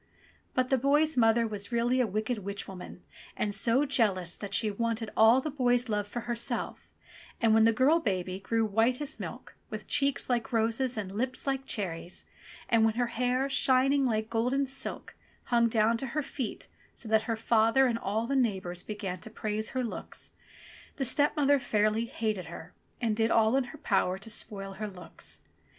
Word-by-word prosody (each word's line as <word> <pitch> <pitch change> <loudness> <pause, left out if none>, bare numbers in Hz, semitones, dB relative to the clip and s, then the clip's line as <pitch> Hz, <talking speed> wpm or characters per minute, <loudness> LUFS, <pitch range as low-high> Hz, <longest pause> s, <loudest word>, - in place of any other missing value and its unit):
But 255 0 +1
the 265 - +4
boy's 295 +4 +3
mother 230 -1 +4
was 210 -1 -3
really 240 +2 +2
a 245 - +1
wicked 215 +3 -2
witch 200 0 -4
woman, 180 -1 -9 0.3
and 205 - -1
so 230 +7 +2
jealous 195 -10 +1
that 200 - -7
she 215 -2 +1
wanted 225 +1 -2
all 225 +4 +6
the 310 - -3
boy's 245 -3 +1
love 205 -1 -1
for 240 +3 -5
herself, 235 0 -3 0.5
and 225 -2 +4
when 220 0 +6
the 225 - +6
girl 265 +8 +4
baby 185 - -2
grew 225 +2 0
white 225 +4 +2
as 295 -2 -4
milk, - - -7 0.2
with - - -6
cheeks 280 -1 +1
like 240 -2 -1
roses 230 +2 0
and 200 -3 -4
lips 250 +6 -3
like 270 -1 -2
cherries, 175 -3 -4 0.4
and 230 -1 +4
when 220 -1 +2
her 245 0 +1
hair, 250 +3 +1
shining 270 0 +3
like 220 -4 0
golden 245 +5 +1
silk, 270 +1 -5 0.3
hung 235 -1 +2
down 225 +1 +3
to 270 - -3
her 300 +5 -2
feet 270 -4 -5 0.3
so - - -11
that 220 0 +3
her 230 - +1
father 225 +3 +3
and 235 -2 0
all 215 +3 -1
the 275 +3 -1
neighbours 190 -8 0
began 200 -3 -5
to 220 - -9
praise 215 0 -3
her 260 -1 -2
looks, 235 - -6 0.6
the 270 - -1
step 290 +4 +2
mother 285 -1 +4
fairly 215 -1 +1
hated 215 -5 -2
her, 170 +1 -10 0.3
and 225 -3 0
did 225 +1 +2
all 225 +2 +4
in 270 -1 +2
her 275 +5 -10
power 195 -9 +1
to 200 +3 -8
spoil 195 -2 -3
her 215 +2 -5
looks. 180 -2 -8
230 Hz, 190 wpm, -29 LUFS, 210-255 Hz, 0.6 s, all